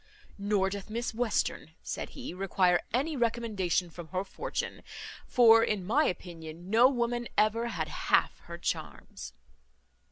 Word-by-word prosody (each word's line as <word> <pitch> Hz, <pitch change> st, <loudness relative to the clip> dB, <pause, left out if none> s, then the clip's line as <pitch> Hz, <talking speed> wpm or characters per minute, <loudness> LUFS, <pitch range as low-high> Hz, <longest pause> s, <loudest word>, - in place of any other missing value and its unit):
"Nor 200 Hz, -1 st, +1 dB
doth 200 Hz, +1 st, -6 dB
Miss 235 Hz, +2 st, -3 dB
Western," 235 Hz, 0 st, -1 dB
said -, -, -4 dB
he, 260 Hz, -8 st, -6 dB
"require 180 Hz, -1 st, +2 dB
any 285 Hz, +7 st, 0 dB
recommendation 220 Hz, -8 st, 0 dB
from 170 Hz, 0 st, -9 dB
her 185 Hz, +3 st, -2 dB
fortune; 200 Hz, -, -4 dB, 0.5 s
for, 225 Hz, -2 st, +6 dB
in 205 Hz, -5 st, -1 dB
my 280 Hz, +10 st, +3 dB
opinion, 170 Hz, 0 st, -6 dB
no 235 Hz, +3 st, +7 dB
woman 240 Hz, -2 st, -1 dB
ever 225 Hz, +2 st, +2 dB
had -, -, -3 dB
half -, -, +1 dB
her -, -, -7 dB
charms." -, -, -5 dB
215 Hz, 135 wpm, -30 LUFS, 185-235 Hz, 0.5 s, no